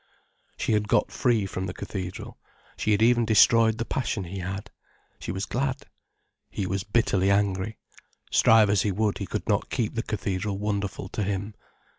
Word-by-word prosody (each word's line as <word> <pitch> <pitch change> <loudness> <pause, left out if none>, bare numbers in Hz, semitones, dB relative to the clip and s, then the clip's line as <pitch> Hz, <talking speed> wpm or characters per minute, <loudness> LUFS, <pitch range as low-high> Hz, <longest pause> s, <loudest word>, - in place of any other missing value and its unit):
She - - -1
had 105 -1 +1
got - - +2
free 120 -6 +1
from 95 0 -4
the 90 - -6
cathedral, 95 -2 -6 0.4
she 110 - -1
had 105 +1 +3
even 120 0 +4
destroyed 115 0 +5
the 115 - -2
passion 115 -6 -2
he 95 +2 -6
had. 95 +2 -5 0.5
She - - -5
was 95 +2 -3
glad. 130 +1 -2 0.7
He 100 - -3
was 95 +1 -2
bitterly 100 -3 +1
angry. 100 +1 0 0.5
Strive 110 -2 +5
as 100 -3 +3
he 105 - 0
would, 105 +1 0
he 100 - -4
could - - -4
not - - 0
keep - - -1
the - - -1
cathedral 100 +1 -3
wonderful 100 -2 -3
to 105 - -4
him. 100 +1 -2
100 Hz, 175 wpm, -26 LUFS, 95-110 Hz, 0.7 s, destroyed